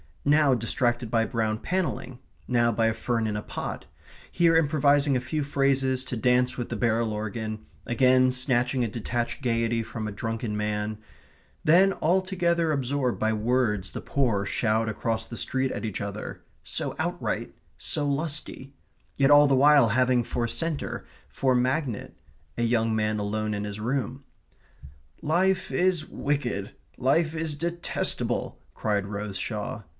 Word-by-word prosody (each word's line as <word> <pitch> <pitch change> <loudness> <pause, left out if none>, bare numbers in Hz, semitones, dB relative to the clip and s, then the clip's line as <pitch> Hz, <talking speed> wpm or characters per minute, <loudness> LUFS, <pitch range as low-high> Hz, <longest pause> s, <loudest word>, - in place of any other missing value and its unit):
Now 145 -1 +5
distracted 120 0 0
by 115 0 +2
brown 110 -3 -1
panelling; 170 -8 -2 0.3
now 120 -1 +3
by 115 0 +2
a 115 - +1
fern 115 0 -1
in 105 -1 -1
a 105 - -2
pot; - - -5 0.5
here 170 -1 +3
improvising 145 -2 +3
a - - +2
few 135 +4 -2
phrases 135 -2 +1
to 125 -2 -4
dance 125 +2 +2
with 120 - -4
the - - -3
barrel 115 -1 +1
organ; 110 0 -4 0.2
again 130 +1 +4
snatching 125 0 +1
a - - +1
detached 120 +3 -3
gaiety 115 -2 +1
from 110 -1 -5
a - - -4
drunken 115 +1 -3
man; 105 0 -2 0.6
then 185 +5 +5
altogether 175 -2 +1
absorbed 135 -2 0
by 110 0 +1
words 110 -3 0
the - - -6
poor 115 -8 0
shout 110 +2 0
across 115 +1 -2
the 115 - -7
street 130 +2 0
at 100 - -4
each 105 -4 -4
other 100 +1 -6 0.2
(so - - -3
outright, - - -2 0.2
so 145 -2 -2
lusty) 140 -2 -2 0.4
yet 135 +1 +4
all 145 0 +8
the 135 - +3
while 140 -2 +6
having 125 +2 +3
for 120 +1 -2
centre, 160 +4 -3 0.3
for 130 -2 +1
magnet, 130 -1 -1 0.4
a 120 - 0
young 115 -1 +1
man 110 0 0
alone 105 +1 -2
in 105 - -3
his 105 0 -6
room. 130 +3 -2 1.0
"Life 185 +4 +1
is 180 -3 +1
wicked 125 -9 -2 0.2
life 155 +5 +2
is 160 -1 -2
detestable," 170 +2 -2 0.2
cried 100 -2 -1
Rose 100 -1 -4
Shaw. 105 +2 -4
125 Hz, 150 wpm, -26 LUFS, 110-140 Hz, 1.0 s, all